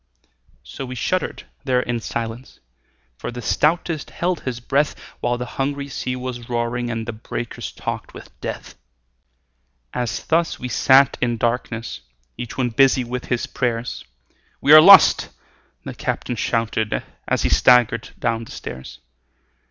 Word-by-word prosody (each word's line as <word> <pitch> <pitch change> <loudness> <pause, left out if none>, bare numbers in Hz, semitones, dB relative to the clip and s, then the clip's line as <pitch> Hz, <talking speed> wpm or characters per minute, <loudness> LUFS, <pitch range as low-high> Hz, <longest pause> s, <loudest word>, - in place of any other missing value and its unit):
So - - -8
we 130 -1 -6
shuddered 185 +8 -2 0.2
there 125 -2 +2
in 120 -1 -2
silence, 115 +2 -5 0.6
For - - -4
the 120 0 -7
stoutest 155 +5 0
held 175 0 -1
his 125 -2 -4
breath, 140 +4 +1 0.2
While 120 0 0
the 125 - -4 0.2
hungry 140 +1 -2
sea 125 -1 -3
was 125 -2 -6
roaring 120 0 -1
And 115 -1 -3
the 120 - -4
breakers 115 +2 -6
talked - - -5
with - - -12
death. - - -6 1.2
As 120 -3 -3
thus 165 0 +1
we 125 - -5
sat 135 +2 +4
in 120 -2 +1
darkness 115 0 -2 0.3
Each 120 - -7
one 125 -2 +1
busy 135 +1 +4
with 125 +1 -5
his 125 -2 -1
prayers, 120 -1 -3 0.6
"We 145 - +5
are 155 - +12
lost!" 195 +3 +8 0.6
the - - -5
captain 120 - -3
shouted, 110 -1 -1 0.2
As - - +1
he - - +2
staggered 125 -2 +4
down 115 -1 -1
the - - -15
stairs. 65 0 -8
125 Hz, 145 wpm, -21 LUFS, 115-135 Hz, 1.2 s, are